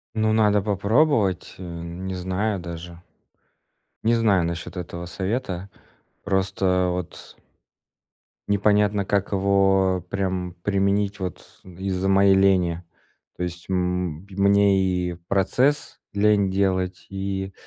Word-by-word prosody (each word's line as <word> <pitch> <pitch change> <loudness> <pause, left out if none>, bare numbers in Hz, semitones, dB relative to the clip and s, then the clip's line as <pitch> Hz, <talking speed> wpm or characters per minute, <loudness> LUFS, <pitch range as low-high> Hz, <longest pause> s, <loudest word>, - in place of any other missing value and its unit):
Ну, 110 0 +2
надо 105 -2 +3
попробовать, 105 - +1
э, 95 - -9
не 85 +2 -6
знаю 95 +3 -2
даже. 85 0 -8 1.0
Не 115 +1 +4
знаю 105 -6 +3
насчет 85 +1 -4
этого 85 -1 -6
совета. 95 +1 -3 0.6
Просто 95 -1 +1
вот 90 -1 -6 1.1
Непонятно, 105 0 +2
как 100 0 0
его 95 -2 +2
прям 95 -2 -2
применить 100 0 +1
вот 90 -1 -7
из-за 95 +1 -3
моей 95 0 +5
лени. 90 -3 +2 0.5
То 90 - -3
есть, 85 0 -6
м, 90 -2 -1
мне 100 0 +4 0.3
и - - -5
процесс 100 - 0
лень 100 -1 +3
делать, 95 -1 0
и 95 0 -4
95 Hz, 110 wpm, -24 LUFS, 90-100 Hz, 1.1 s, моей